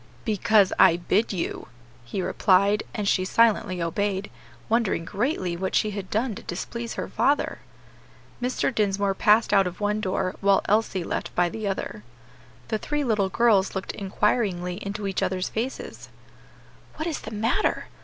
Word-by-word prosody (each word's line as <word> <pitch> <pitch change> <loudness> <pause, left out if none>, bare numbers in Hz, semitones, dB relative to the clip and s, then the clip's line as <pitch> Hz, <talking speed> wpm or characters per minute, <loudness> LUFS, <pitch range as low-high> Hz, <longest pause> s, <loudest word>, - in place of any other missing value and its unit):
"Because 215 -2 +3
I 170 - +7
bid 195 +5 +1
you," 180 -4 -4 0.4
he 185 +10 -3
replied; 200 +3 +3
and 210 -3 -3
she 185 - +2
silently 190 -3 +2
obeyed, 195 +3 -2 0.4
wondering 225 -7 +1
greatly 195 - -1
what 190 +2 -2
she 215 - +2
had 195 -2 -6
done 225 +2 0
to - - -8
displease 235 +6 -5
her - - -3
father. 285 +1 +1 0.8
Mr. 255 +1 0
Dinsmore 200 -2 +1
passed 210 +3 +3
out 195 -2 +5
of 180 0 -7
one 210 +1 0
door 185 -1 -1
while 200 -1 +4
Elsie 210 -3 +1
left - - -4
by 175 0 +3
the 215 +3 -4
other. 195 - -4 0.7
The 215 - 0
three 295 +4 -2
little 210 -6 +1
girls 205 -4 +3
looked 190 - -3
inquiringly 195 -2 -1
into 200 +1 -4
each 195 -1 -1
other's 185 -1 -1
faces. 240 +4 -5 0.9
"What 310 - -4
is 325 - -3
the - - -7
matter? 225 - 0
200 Hz, 155 wpm, -25 LUFS, 190-220 Hz, 0.9 s, I